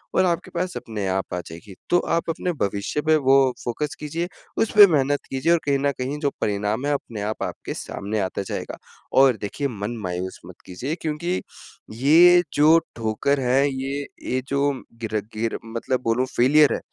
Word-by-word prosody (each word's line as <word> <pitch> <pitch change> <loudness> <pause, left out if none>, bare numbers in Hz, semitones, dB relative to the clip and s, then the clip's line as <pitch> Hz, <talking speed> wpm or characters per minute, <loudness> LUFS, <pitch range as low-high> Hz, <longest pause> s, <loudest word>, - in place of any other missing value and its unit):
और 185 - +4
आपके 175 +1 -1
पास 180 +1 -2
अपने 105 -3 -4
आप 95 0 -2
आ 90 - -1
जाएगी। 85 +5 -11 0.2
तो 175 - +4 0.2
आप 170 - -2
अपने 180 +2 -1
भविष्य 100 +8 -1
पे 155 - +6
वो 135 - +7 0.3
फोकस 150 +6 -3
कीजिए। 160 +3 -3 0.3
उसपे 210 -2 +7
मेहनत 145 -3 +2
कीजिये 135 +6 +2
और 170 - +3
कहीं 140 -1 +2
न 140 +1 +1
कहीं 135 +3 -2
जो 145 -2 +1
परिणाम 105 +5 -1
है, 145 - +1
अपने 115 -6 -4
आप 105 +2 -3
आपके - - -5
सामने 105 +2 -4
आते 95 0 -2
जाएगा। - - -5 0.4
और 135 -4 +5
देखिए, 140 +8 -2
मन 115 -1 -5
मायूस 90 0 -4
मत 90 0 -11
कीजिये 125 - -4
क्योंकि 165 +4 -2 0.6
ये 175 +6 +6
जो 155 +3 +6 0.2
ठोकर 115 +5 0
है, 135 +2 +3
ये 135 +1 -3 0.2
ये, 130 +1 0
जो 140 +1 +1 0.3
गिर 110 -1 -4 0.2
गिर 115 +1 -1
मतलब 115 +3 -2
बोलूँ 120 +2 +1
फेलियर 145 +4 +5
है, - - -2
135 Hz, 180 wpm, -23 LUFS, 110-150 Hz, 0.6 s, वो